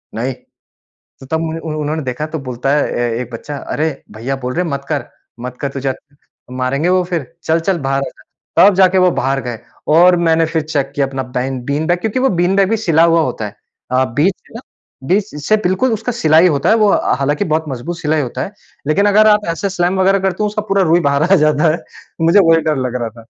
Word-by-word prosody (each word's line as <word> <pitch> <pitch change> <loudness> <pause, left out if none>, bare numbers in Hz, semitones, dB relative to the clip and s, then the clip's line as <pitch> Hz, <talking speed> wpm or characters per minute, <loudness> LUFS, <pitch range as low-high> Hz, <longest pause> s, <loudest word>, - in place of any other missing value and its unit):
नहीं! 125 +4 -2
तो - - -26 0.6
तब 160 +4 -1
मु 165 0 -3
उन-उन्होंने 155 0 -3
देखा 130 +3 -3
तो 160 +1 -5
बोलता 130 -1 -3
है 150 - +1
ए-एक 120 0 -2
बच्चा, 145 +5 -6
"अरे! 155 +3 -2 0.3
भईया 130 +5 -3
बोल 125 - -2
रहे 180 - 0
मत 140 -4 -4
कर 145 - -1 0.4
मत 125 +1 -6
कर 140 - -1
तुझे 135 -1 -2 0.6
मारेंगे 130 +5 -1
वो 185 0 +3
फ़िर, 170 -6 -3 0.2
चल-चल 165 +3 +1
बाहर 135 0 +1
आ - - -3
जा।" - - -21 0.5
तब 205 - +2
जाके 190 0 +4
वो 180 -1 +4
बाहर 135 -3 -1
गए 120 -2 -5 0.4
और 180 +2 +6
मैंने 165 -1 +2
फ़िर 160 -1 -1
चेक 145 -3 -2
किया 140 -1 +1
अपना 135 0 -4
बेन 130 0 -2
बीन 145 +3 -1
बैग 175 0 +1
क्योंकि 220 +5 -2
वो 270 - +3
बीन 180 +2 +2
बैग 195 -1 +3
भी 225 - +2
सिला 165 -7 +2
हुआ 165 0 +4
होता 120 -6 -3
है 100 - -10 0.4
अ, 130 +1 +3
बीच 145 - +1
से - - -22
ना, 230 - -6 0.5
बीच 200 -2 0
से 215 - +4
बिल्कुल 210 +7 +1
उसका 225 +3 -2
सिलाई 160 -5 +4
होता 140 -4 0
है, - - +6
वो 215 -2 +3
अ, - - +1
हालाँकि 145 +2 0
बहुत 160 0 0
मज़बूत 145 +6 -5
सिलाई 155 0 0
होता 125 0 -4
है। 195 - -5 0.3
लेकिन 200 +7 +2
अगर 215 +1 +5
आप 210 -2 +3
ऐसे 200 +4 -2
स्लैम 180 +1 0
वग़ैरह 195 +1 +3
करते 190 +1 -1
हो 210 - +2
उसका 210 0 -3
पूरा 195 0 +2
रुई 170 0 +3
बाहर 140 +1 +1
आ - - +9
जाता 155 -1 +2
है। - - -1 0.5
मुझे 180 +5 +6
वही 165 -1 +4
डर 150 - 0
लग 125 - -4
रहा 115 - -2
था। - - -23
160 Hz, 230 wpm, -16 LUFS, 135-185 Hz, 0.6 s, आ